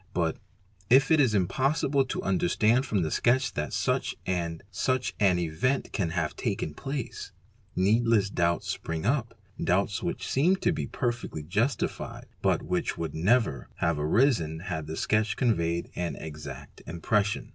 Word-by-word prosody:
But 85 -2 0 0.5
if 135 +4 +5
it 160 - +6
is 125 -7 +4
impossible 135 - +2
to 130 - -4
understand 110 +7 +2
from 100 -7 +1
the 80 - -2
sketch 130 +3 +2
that 75 +1 -3
such - - 0
and 85 -3 -2
such 130 +7 0
an 95 -4 +4
event 90 - 0
can 95 -5 0
have 85 -2 -2
taken 75 - -2
place, 135 - -5 0.4
needless 105 +1 +3
doubts 85 -2 +1
spring 80 -1 -3
u 110 - +2
0; 135 -5 -1 0.4
doubts 95 +2 +1
which - - -3
seem 165 +8 +3
to 180 - +1
be 160 - -3
perfectly 120 - -3
justified 110 - -2 0.2
but - - +2
which - - -1
would 80 -3 -3
never 105 - +1
have 85 -2 0
arisen 80 - +2
had 80 -4 -4
the 80 +1 -5
sketch 110 0 +1
conveyed 85 -8 0
an 90 -1 -2
"exact 75 -3 -9
impression"'. 100 +5 0
95 Hz, 155 wpm, -28 LUFS, 85-125 Hz, 0.5 s, it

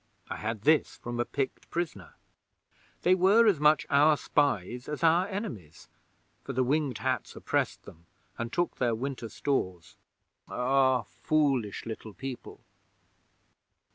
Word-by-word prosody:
I - - -3
had 110 -1 -4
this 155 0 +3
from 120 0 -5
a 120 - +1
Pict 135 +1 -4
prisoner. 155 - -4 0.9
They 180 - +5
were 195 +5 +5
as 200 -9 +4
much 150 -1 +4
our 150 +2 +5
spies 125 -4 0
as 150 +2 -4
our 170 +3 +4
enemies, 170 - -7 0.5
for - - -5
the 130 - +2
Winged 140 -2 0
Hats - - -2
oppressed - - -1
them, 85 +1 -15 0.3
and 115 0 -4
took 175 0 -1
their 120 -3 +1
winter 125 -1 -4
stores. 95 -13 -2 0.5
Ah, 130 0 +2
foolish 135 -9 0
Little 110 -2 -7
People! 130 -2 -7
135 Hz, 135 wpm, -29 LUFS, 115-155 Hz, 0.9 s, They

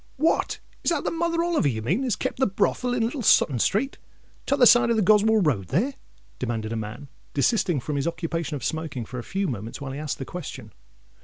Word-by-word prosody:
"What—is 315 +5 -1
that 335 -4 0
the - - -1
Mother 335 0 0
Oliver 340 - +1
you 110 -5 -2
mean, 180 - 0
as 250 -5 0
kept - - -3
the 265 - +3
brothel 230 +5 0
in 235 - +1
Little 250 +3 -3
Sutton 145 - +4
Street, 225 - 0 0.5
t'other 270 -2 +4
side 240 0 +7
of 230 - +3
the 215 - +2
Goswell 215 +1 +4
Road 105 - 0
there?" 230 - 0 0.5
demanded 115 -3 -3
a - - -2
man, 110 +6 -6 0.3
desisting 175 - +2
from 145 +3 -3
his 140 - -1
occupation 165 -1 -3
of 135 - -6
smoking, 160 -7 -3
for 125 +3 -7
a - - -6
few 195 +6 -2
moments, 115 - -5
while 140 -2 -5
he 135 - -5
asked 150 -2 -3
the 135 - -5
question. 180 +1 -8
170 Hz, 215 wpm, -25 LUFS, -, 0.5 s, side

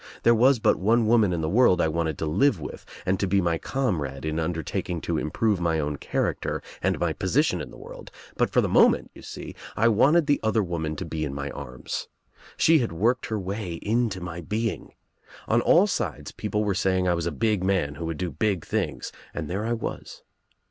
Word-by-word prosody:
There 115 - +6
was 125 +4 +5
but 110 - +2
one 115 +4 +3
woman 110 -3 +4
in 85 -2 -1
the 80 - -1
world 105 +1 +4
I - - +3
wanted 80 -1 -1
to - - -2
live 95 - +2
with 75 - -8 0.2
and 95 0 +1
to 100 - 0
be 100 +2 +3
my 85 -3 0
comrade 80 - -2
in 80 0 -2
undertak 80 -2 -2
ing 85 -2 -2
to 80 -2 -1
improve 100 +7 0
my 85 -2 +1
own 75 -1 -2
character - - -2 0.2
and - - +1
my - - 0
position - - +1
in - - -7
the - - -13
world, - - -11 0.3
but - - +1
for - - +3
the - - 0
moment, - - +4
you - - -13
see, - - -8 0.2
I 115 +2 +4
wanted 145 +9 +4
this 145 -1 +2
other 110 -1 +1
woman 80 -3 -3
to 90 - -5
be 80 -1 -3
in 70 -2 -3
my 70 0 -4
arms. 65 -3 -6 0.5
She 160 0 +5
had 120 - -1
worked 115 +9 +1
THE 110 - -1
OTHER - - -1
WOMAN 95 +2 -4
her - - -4
way 85 - -4
into 110 0 -1
ihy 85 -2 -7
being. 110 +1 -2 0.5
On 120 +2 +3
all 175 +10 +5
sides 75 - -3
people 105 0 -2
were 105 -2 +1
saying 95 0 +1
I 90 - +3
was 85 -1 -1
a - - -1
big 105 +5 0
man 95 -7 +1
who 85 - -6
would 80 -1 -3
do 90 +1 -3
big 100 -6 -1
things, - - -2 0.2
and 80 -2 -3
there 100 +7 -3
I 120 - +1
was. 115 - -6
95 Hz, 230 wpm, -25 LUFS, 80-110 Hz, 0.5 s, There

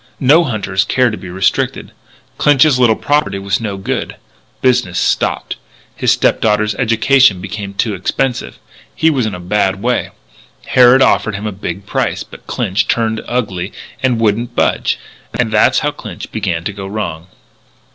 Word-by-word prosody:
No 150 +6 +5
hunters 100 -7 -1
care 125 +1 +2
to - - -3
be 95 - -9
restricted. 95 +2 -1 0.5
Clinch's 145 -2 +4
little 120 -3 +4
property 145 -7 0
was 100 +2 -1
no 105 -3 -3
good. 95 - -3 0.4
Business 120 -9 +1
stopped. - - 0 0.4
His - - +1
stepdaughter's 105 -1 +2
education 115 0 +3
became 100 +1 -6
expensive. 120 +5 -2 0.4
He 160 - +3
was 130 -6 0
in 105 - -4
a - - -8
bad 95 +1 0
way. 120 +4 -1 0.6
Harrod 125 +1 +6
offered 105 - +2
him 100 +2 -5
a 105 - -2
big 100 0 -6
price. - - -1
But - - -15
Clinch 95 - -1
turned 110 -1 0
ugly 100 -7 -2 0.3
and 125 -3 +1
wouldn't 115 +2 0
budge. - - +1 0.4
And 115 -3 +1
that's 105 0 +3
how - - +1
Clinch - - -9
began 80 -1 -2
to 100 - -3
go 95 -1 -7
wrong." 90 -5 -4
110 Hz, 155 wpm, -15 LUFS, 95-125 Hz, 0.6 s, Harrod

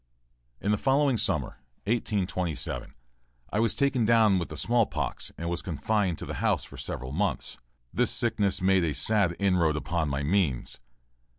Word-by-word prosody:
In 105 - 0
the 105 - +1
following 135 0 +3
summer, 110 - -1 0.2
1827, 95 - -2 0.6
I 105 - +2
was 115 0 +2
taken 140 -3 +2
down 110 -4 +4
with 85 - -4
the - - -7
small 115 -2 +2
pox 75 -4 -3
and 85 - -4
was 85 +1 -2
confined 95 +1 0
to - - -7
the - - -5
house - - +2
for - - -11
several 65 0 -5
months. 85 -2 -1 0.3
This - - +2
sickness 105 -5 +1
made 95 -1 +4
a 80 -4 0
sad 90 +4 +2
inroad 90 -6 +2
upon 80 +1 -1
my 70 +1 -1
means. 80 -6 0
95 Hz, 165 wpm, -28 LUFS, 80-110 Hz, 0.6 s, down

